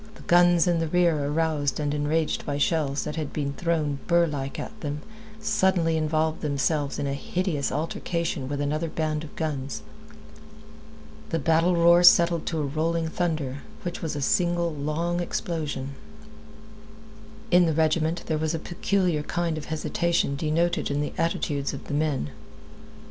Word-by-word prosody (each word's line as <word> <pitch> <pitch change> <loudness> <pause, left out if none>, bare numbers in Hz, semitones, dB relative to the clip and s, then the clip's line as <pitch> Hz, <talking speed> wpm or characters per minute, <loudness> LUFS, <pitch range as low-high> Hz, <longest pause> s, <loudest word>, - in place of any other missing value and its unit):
The - - -14
guns 175 -1 +5
in 175 -2 +2
the 165 - 0
rear, 165 -4 +2
aroused 150 -2 0
and 145 -1 -1
enraged 150 +2 0
by 145 -1 -2
shells 145 -2 +1
that 150 +1 -5
had 155 -3 -3
been 140 -2 -2
thrown 155 -3 -1
burr 170 -1 +4
like 140 -4 -4
at 220 - -7
them, 150 -2 -4 0.4
suddenly 190 -6 +2
involved 155 0 0
themselves 145 0 0
in - - -2
a 140 - -1
hideous 155 0 -2
altercation 165 -2 -2
with 145 0 -2
another 155 +3 -1
band 155 -1 -2
of 155 - -11
guns. 140 -4 -3 1.5
The 165 - 0
battle 165 +3 +3
roar 170 +1 +6
settled 170 -1 +6
to 165 - -1
a 150 - 0
rolling 160 +3 -1
thunder, 155 -6 -2 0.2
which 175 -2 -4
was 160 -3 -3
a 145 - -3
single, 170 +3 +1
long 155 +4 -1
explosion. 150 -6 -3 1.6
In 175 -1 +6
the 160 - +1
regiment 160 +2 +1
there 155 -1 -1
was 160 +1 0
a - - 0
peculiar 175 -1 0
kind 170 +1 -1
of 155 - -6
hesitation 165 -1 0
denoted 160 +4 0
in 145 +1 0
the 150 - -3
attitudes 145 -4 -1
of - - -8
the - - -6
men. 145 - 0
160 Hz, 160 wpm, -26 LUFS, 145-170 Hz, 1.6 s, roar